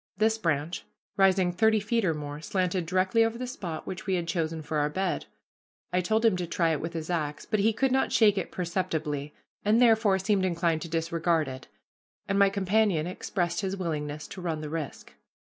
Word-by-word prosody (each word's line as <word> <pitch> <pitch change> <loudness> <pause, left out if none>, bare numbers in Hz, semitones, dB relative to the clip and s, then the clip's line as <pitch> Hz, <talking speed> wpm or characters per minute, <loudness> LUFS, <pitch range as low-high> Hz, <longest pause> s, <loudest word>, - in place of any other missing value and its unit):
This 220 +1 +2
branch, 165 -2 -1 0.3
rising 190 -2 +4
thirty 220 +4 +3
feet 225 +3 0
or 165 -4 +1
more, 145 0 -6
slanted 180 -1 -1
directly 185 +5 +3
over 225 +1 -1
the 250 - -4
spot 180 -11 -6
which 190 +3 -6
we 190 - +2
had 170 -2 -2
chosen 165 -2 -2
for 150 0 -1
our 145 0 +1
bed. 190 +5 -2 0.7
I 180 - +3
told 220 +5 +1
him 220 -4 +5
to 180 -1 -3
try 165 0 +1
it 155 - -1
with 165 +2 -4
his 165 +1 -4
axe, 150 -4 -2
but 215 - 0
he 215 +3 +4
could 265 +4 +1
not 265 +1 +2
shake 210 -3 +5
it 190 -4 -3
perceptibly, 160 -5 -2 0.3
and, 215 +3 +4
therefore, 220 -5 +5
seemed 190 0 +1
inclined 170 -3 +1
to 170 - -6
disregard 165 -1 0
it, 130 0 -8 0.6
and 195 0 +1
my 200 0 +6
companion 195 -4 +1
expressed 175 -1 -2
his 195 0 -2
willingness 150 -4 -3
to 190 - -8
run 165 -3 -2
the 150 -1 -6
risk. 160 -3 -5
180 Hz, 200 wpm, -28 LUFS, 160-200 Hz, 0.7 s, my